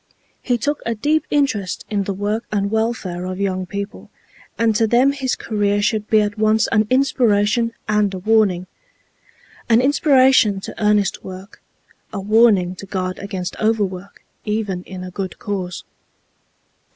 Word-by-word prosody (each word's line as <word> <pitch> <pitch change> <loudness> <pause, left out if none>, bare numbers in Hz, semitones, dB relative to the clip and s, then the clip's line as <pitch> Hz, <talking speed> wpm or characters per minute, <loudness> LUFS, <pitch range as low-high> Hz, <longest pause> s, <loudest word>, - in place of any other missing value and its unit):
He 245 -1 0
took 290 +6 -2
a 230 - -2
deep 300 +7 0
interest 255 -10 0
in 200 -2 -1
the 200 - -2
work 210 +3 -2
and 200 -1 -1
welfare 220 -6 -2
of 185 +1 -5
young 185 -2 -1
people, 200 +1 -6 0.5
and 225 -1 +2
to 225 +1 +3
them 245 +5 +4
his 270 -2 -2
career 205 -2 0
should 215 0 0
be 215 -1 +5
at 210 +1 -3
once 215 0 +3
an 215 0 +2
inspiration 235 -4 +2 0.2
and 210 -1 +2
a 190 - -5
warning—an 215 - -2
inspiration 260 -6 +4
to 215 - -7
earnest 210 -2 +2
work, 190 +2 -10 0.5
a 205 - -4
warning 205 -3 +3
to 195 - -9
guard 185 -1 -3
against 190 -3 -5
overwork 200 -3 -2 0.2
even 210 -4 -2
in 185 -1 -8
a 185 - -7
good 190 0 -5
cause. 185 -4 -4
210 Hz, 150 wpm, -20 LUFS, 195-230 Hz, 0.5 s, be